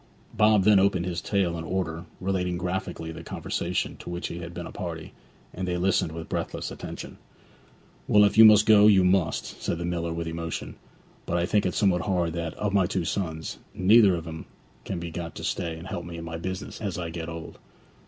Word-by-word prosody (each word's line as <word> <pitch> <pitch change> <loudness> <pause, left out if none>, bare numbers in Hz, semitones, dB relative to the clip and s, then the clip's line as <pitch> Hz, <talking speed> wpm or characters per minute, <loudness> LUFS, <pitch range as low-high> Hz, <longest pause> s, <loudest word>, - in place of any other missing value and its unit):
Bob 105 -2 +4
then 105 0 +6
opened 95 -2 +2
his 85 -2 -3
tale 95 -2 0
in - - -5
order, 85 -1 -3
relating 90 -2 -1
graphically 90 -2 -3
the 80 0 -8
conversation 85 +2 -2
to - - -9
which 85 0 -4
he 85 - -6
had 85 -1 -7
been 85 0 -6
a - - -8
party, 85 -3 -6 0.4
and 95 0 -4
they 90 0 -1
listened 90 -3 +1
with 80 0 -7
breathless - - -3
attention. - - -8 0.9
'Well, 105 0 +6
if 100 0 +3
you 110 - +9
must 105 -1 +8
go, 105 -1 +7
you 95 -3 +6
must,' 90 -2 0
said 85 - -1
the 85 - -3
miller 85 -1 -2
with 85 0 -3
emotion; 85 0 -4 0.5
'but 85 - 0
I 85 - +1
think 100 +1 +2
it 90 - -3
somewhat 95 -4 +3
hard 85 -2 0
that, 85 -1 -4
of 105 -1 -2
my 95 -3 +3
two 90 -2 -2
sons, 80 -3 -3 0.2
neither 105 +3 +6
one 90 - +2
of 85 0 -7
'em 80 0 -7 0.4
can 95 - -3
be 85 0 -5
got 85 0 -6
to - - -7
stay 80 -1 -2
and 85 +3 -9
help 85 - -4
me 85 -1 -7
in 85 - -6
my 80 0 -5
business 95 +5 -5
as 100 -4 -3
I 85 -2 -4
get 80 0 -5
old.' 80 -1 -8
90 Hz, 220 wpm, -26 LUFS, 85-95 Hz, 0.9 s, you